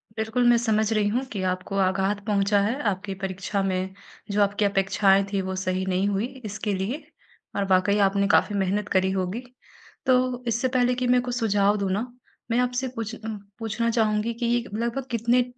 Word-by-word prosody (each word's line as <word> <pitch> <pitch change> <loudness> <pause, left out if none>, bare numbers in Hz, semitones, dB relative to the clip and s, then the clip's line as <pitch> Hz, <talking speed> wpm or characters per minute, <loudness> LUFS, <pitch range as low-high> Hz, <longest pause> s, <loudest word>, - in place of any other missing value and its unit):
बिल्कुल, 220 +2 0
मैं 240 - +6
समझ 220 -2 +1
रही 210 -1 +2
हूँ 245 +6 0
कि 200 -3 -3
आपको 185 +2 -2
आघात 195 +2 +1
पहुँचा 200 -1 +2
है 230 +8 0
आपकी 195 +1 -4
परीक्षा 195 +1 -2
में 190 0 -1 0.4
जो 205 +1 +2
आपकी 205 +1 +1
अपेक्षाएँ 195 0 +3
थीं, 195 -1 0
वो 190 0 -3
सही 185 0 -1
नहीं 190 +1 +1
हुई 205 +2 0 0.2
इसके 210 0 -3
लिए 210 +11 -3 0.5
और 200 - 0
वाक़ई 190 +2 +3
आपने 200 0 +3
काफ़ी 205 0 +3
मेहनत 200 +2 0
करी 190 0 +2
होगी। 190 +5 -2 0.6
तो, 255 -1 +2
इससे 235 +3 +1
पहले 250 -1 +2
कि 250 0 -1
मैं 250 0 +4
कुछ 245 -1 -3
सुझाव 205 -3 +2
दूँ 200 -1 -1
न 210 +5 0 0.5
मैं 240 - +3
आपसे 250 +1 0
कुछ 230 -2 -5
अ, - - -13 0.4
पूछना 225 +1 -1
चाहूँगी 220 0 +1
कि 235 +1 -3
ये 240 0 +1
लगभग 235 +4 -2
कितने 235 +2 +3
210 Hz, 190 wpm, -25 LUFS, 195-235 Hz, 0.6 s, मैं